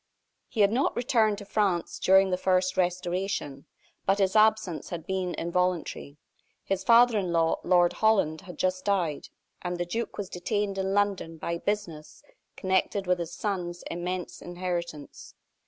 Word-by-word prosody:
He 225 - -1
had 200 0 +5
not 255 +5 +1
returned 230 -4 +2
to 205 - -9
France 195 -5 0
during 190 0 +5
the - - +3
first 185 0 +1
Restoration; 180 -5 -2 0.4
but 195 +1 +4
his 195 0 +1
absence 215 -7 +3
had 170 -2 -6
been 185 -2 -2
involuntary. 170 -4 -2 0.5
His 195 -1 -2
father 235 0 +6
in 185 -3 -2
law, 165 -1 +2
Lord 175 -1 +4
Holland, 195 -8 +2
had 180 -4 -11
just 185 0 0
died, 175 -7 -1 0.3
and 180 0 -3
the 175 - -2
duke 225 +7 -4
was 205 - -3
detained 200 +2 -2
in 190 +1 -1
London 200 -5 0
by 170 +1 -3
business 175 -8 -4 0.3
connected 190 +1 0
with 180 -1 +1
his 170 0 -5
son's 180 -4 -3
immense 180 +1 -4
inheritance. 175 -4 -5
185 Hz, 155 wpm, -27 LUFS, 175-200 Hz, 0.5 s, father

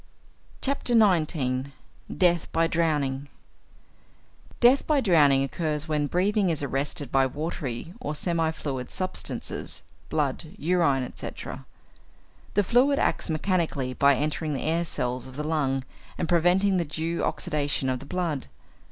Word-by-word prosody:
XIX. 170 - +2 0.4
DEATH 175 -2 +2
BY 165 0 +3
DROWNING 145 -5 0 1.3
Death 250 +3 +5
by 300 -2 +3
drowning 150 - +5
occurs 150 +2 -2
when 150 -2 0
breathing 195 - +2
is 155 -3 -1
arrested 140 0 -2
by 135 0 +4
watery 145 0 -4
or 155 -11 -4
semi 165 0 0
fluid 135 -5 -4
substances 185 -1 -4 0.3
blood, 155 +3 -2
urine, 165 -7 +2
etc. 125 - -7 0.9
The 205 - +4
fluid 255 +7 +3
acts - - 0
mechanically 155 -6 0
by 140 +1 +4
entering 150 +2 -1
the 130 - -3
air 165 +2 +1
cells 125 -4 -2
of 130 - -11
the 150 - -3
lung 140 -4 0 0.3
and - - -1
preventing 180 +3 +3
the 170 - 0
due 160 +3 -2
oxidation 145 -2 -1
of 130 -1 0
the 140 - -11
blood. 165 -5 -2
155 Hz, 130 wpm, -26 LUFS, 140-175 Hz, 1.3 s, Death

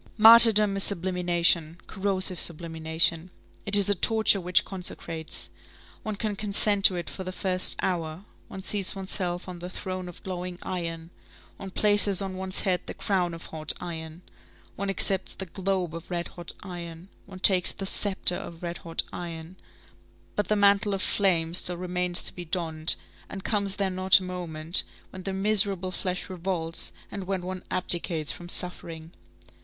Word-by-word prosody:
Martyrdom 220 -2 +8
is 195 - +4
sublimation, 175 -3 +1
corrosive 190 -2 -1
sublimation. 165 +1 0 0.4
It 200 - +2
is 200 -2 +7
a 205 - +4
torture 220 0 +2
which 180 +1 +1
consecrates. 165 -4 -2 0.5
One 215 -1 -5
can 210 0 -3
consent 205 -1 +1
to 185 - +9
it 175 -1 -5
for 190 - -6
the 185 - -6
first 185 0 0
hour; 170 0 -3 0.2
one 190 - -10
seats 200 -1 0
oneself 185 -2 -4
on 180 -1 -8
the 175 +1 -7
throne 185 0 -6
of 175 - -14
glowing 180 -1 -6
iron, 165 -2 -5 0.5
one 195 - -8
places 205 0 +3
on 195 -2 -4
one's 190 0 -1
head 185 -2 0
the - - -6
crown 180 -4 -1
of 165 - -10
hot 155 -1 +2
iron, 160 0 -8 0.5
one 200 0 -4
accepts 195 -1 +1
the 190 - -6
globe 185 -2 -3
of 165 0 -9
red 175 -1 -4
hot 175 -1 -8
iron, 170 -2 -9 0.2
one 190 -1 -11
takes 185 -2 +5
the 195 - -7
sceptre 190 -2 +2
of 165 +1 -10
red 170 0 -5
hot 165 -1 -1
iron, 170 0 -8 0.8
but 205 - -1
the 215 - +1
mantle 200 0 +3
of 190 - -3
flame 170 -5 +1
still 180 0 +1
remains 180 0 -2
to - - -2
be 175 - -8
donned, 160 -2 +2 0.3
and 195 -1 -8
comes 200 -3 0
there 195 -2 -2
not 185 +1 +5
a - - -9
moment 170 -2 +2 0.3
when 185 - -9
the 195 - -5
miserable 195 -2 +2
flesh 180 0 -4
revolts 175 -3 -2 0.2
and 200 -2 -6
when 190 -2 -3
one 185 0 -6
abdicates 170 -4 0
from 175 0 -9
suffering? 165 -3 0
185 Hz, 165 wpm, -26 LUFS, 170-195 Hz, 0.8 s, to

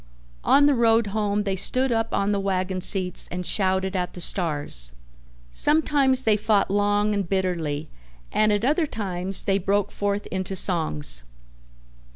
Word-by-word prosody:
On 285 +1 +5
the 290 - +4
road 230 -2 +3
home 210 -1 0
they 195 -2 -2
stood 255 +7 0
up 225 -1 -1
on 200 +1 0
the 200 - 0
wagon 185 -1 -2
seats 180 -1 0
and 180 0 -4
shouted 190 0 0
at 180 -1 -2
the - - -9
stars. 145 - -1 0.6
Sometimes 285 - +2
they 220 -3 +3
fought 210 -2 +1
long 205 +1 +1
and 200 -4 -2
bitterly 165 -6 -2 0.4
and 215 0 +2
at 205 +2 0
other 310 +4 +1
times 190 -5 +2
they 195 -1 +1
broke 200 +1 0
forth 205 0 -2
into 190 0 -3
songs. 75 - -1
200 Hz, 155 wpm, -24 LUFS, 180-215 Hz, 0.6 s, On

